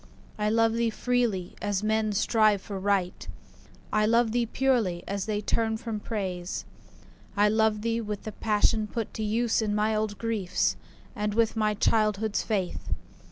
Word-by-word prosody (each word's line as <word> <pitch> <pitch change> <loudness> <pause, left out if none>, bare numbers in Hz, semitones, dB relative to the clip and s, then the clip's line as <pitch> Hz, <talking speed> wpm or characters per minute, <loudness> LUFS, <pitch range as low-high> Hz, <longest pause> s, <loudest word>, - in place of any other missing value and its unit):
I 210 0 +1
love 225 0 +3
thee 230 0 +1
freely, 225 -6 -1
as 205 -1 -1
men 215 0 +1
strive 215 0 +3
for 195 0 -6
Right; 190 -2 0 0.7
I 215 0 +3
love 230 0 +3
thee 240 0 +1
purely, 230 -9 +1
as 200 0 -3
they 210 -1 -1
turn 220 +1 0
from 220 -1 -4
Praise. 190 -5 -4 0.7
I 205 +1 +5
love 215 -1 +2
thee 230 0 0
with 210 -2 -5
the 215 - -5
passion 215 0 +1
put 225 +1 -4
to 220 - -3
use 225 +2 +1
In 210 -1 0
my 215 +1 +1
old 215 -1 -1
griefs, 220 -6 0 0.4
and 210 0 -2
with 230 0 +2
my 215 -1 +1
childhood's 215 0 +1
faith. 195 -5 -2
215 Hz, 160 wpm, -27 LUFS, 205-225 Hz, 0.7 s, I